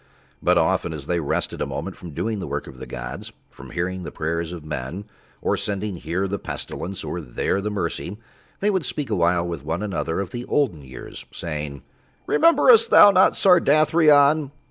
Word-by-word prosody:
But - - +3
often - - +1
as 75 -3 -7
they 85 +2 0
rested 75 - -2
a - - -1
moment 90 +6 -5
from 90 - -10
doing 110 +8 -3
the 90 - -5
work - - -3
of 65 - -12
the - - -8
gods, - - -7 0.2
from - - -12
hearing 90 +1 -3
the 90 - -7
prayers 85 +1 -3
of 85 -4 -8
men 75 +6 -5 0.4
or - - +2
sending 100 -1 -3
here 85 +4 -2
the 100 +1 -3
Pestilence 95 +2 -6
or - - -4
there 65 +10 -1
Mercy, 105 -1 -3 0.4
They 205 +1 +3
would 190 -4 0
speak 145 -6 -3
awhile 85 -2 +2
with 85 -5 -5
one 80 +6 -3
another 95 -5 -2
of 100 -2 -4
the 120 0 -5
olden 130 - 0
years 65 -2 -10
saying, 75 -4 -5 0.4
"Rememberest 445 +8 +5
thou 205 - +9
not 190 -1 +5
Sardathrion?" 155 -4 +4
95 Hz, 180 wpm, -23 LUFS, -, 0.4 s, thou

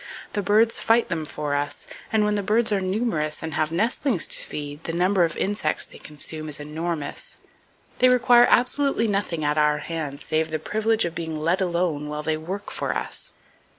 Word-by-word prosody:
The 205 - 0
birds 215 +4 +3
fight 230 +1 +3
them 165 -3 -2
for 150 -1 -3
us, 145 0 -2 0.3
and 215 -1 +3
when 210 - +1
the 205 - 0
birds 220 +3 +2
are 200 -2 +2
numerous 185 -7 -1
and 160 -1 -4
have 155 +1 0
nestlings 225 - +1
to - - -2
feed, 145 +1 -6
the 165 - -3
number 180 +1 +3
of 165 - -4
insects 195 -6 0
they - - -13
consume 155 +1 -4
is 150 - -2
enormous. 155 +1 -4 0.6
They 255 - +6
require 245 -1 +6
absolutely 250 -1 +3
nothing 195 -6 -1
at 150 +1 +2
our 150 0 +3
hands 150 -2 -4
save 155 0 0
the 155 - -1
privilege 220 +7 +1
of 170 - -3
being 160 -2 -4
let 170 +5 +1
alone 170 -5 0
while 150 0 -4
they 160 0 0
work 185 +6 -6
for - - -2
us! - - -3
170 Hz, 190 wpm, -24 LUFS, 155-210 Hz, 0.6 s, They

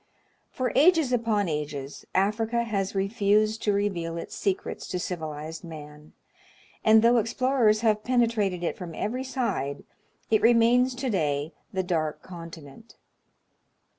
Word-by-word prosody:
For 255 -1 -2
ages 315 -3 +4
upon 225 -4 +1
ages, 150 -3 -5
Africa 220 +4 +1
has 200 -4 -2
refused 210 +2 +1
to 210 - +1
reveal 185 -5 -1
its 165 - -7
Secrets 195 -2 -2
to - - -3
civilized 160 -2 -5
man, 150 -2 -11 0.7
and, 220 0 +6
though 235 +1 +5
explorers 230 -1 +2
have 215 -2 +2
penetrated 225 -7 +1
it 170 - -1
from 175 -3 -8
every 250 +5 -2
side, 230 - -2 0.5
it 220 -1 +4
remains 240 +2 +4
to 255 0 -2
day 150 -4 -1 0.2
the 190 -1 -1
dark 155 -4 -2
continent. 165 +2 -11
205 Hz, 130 wpm, -26 LUFS, 165-230 Hz, 0.7 s, and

